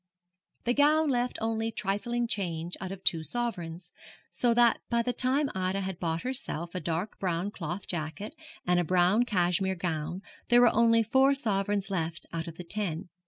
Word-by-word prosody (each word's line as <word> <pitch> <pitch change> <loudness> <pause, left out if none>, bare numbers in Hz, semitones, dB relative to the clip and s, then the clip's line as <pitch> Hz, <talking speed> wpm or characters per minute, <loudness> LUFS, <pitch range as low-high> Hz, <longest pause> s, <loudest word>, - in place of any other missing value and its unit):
The 240 - +1
gown 300 +2 +4
left 245 0 0
only 225 0 -1
trifling 220 +4 -1
change 175 -5 -1
out 190 -1 -4
of 195 -1 -8
two 165 -3 +2
sovereigns, 175 -3 -4 0.4
so 245 - +2
that 240 -1 +4
by 235 0 +2
the 245 +1 -1
time 270 +3 +2
Ida 190 +1 -1
had 190 -2 -4
bought 165 -1 -2
herself 210 - -4
a 185 - -2
dark 175 +4 -3
brown 180 +1 -1
cloth 175 0 -5
jacket 160 +4 -4 0.3
and 180 0 +3
a - - +2
brown 185 +7 +3
cashmere 190 -2 +1
gown 175 0 -3 0.3
there 240 0 +6
were 245 - +6
only 230 0 +4
four 265 +5 +4
sovereigns 200 -5 0
left 170 -2 -2
out 165 0 -3
of 165 - -7
the 180 - -6
ten. 175 -3 -4
195 Hz, 175 wpm, -29 LUFS, 175-235 Hz, 0.4 s, there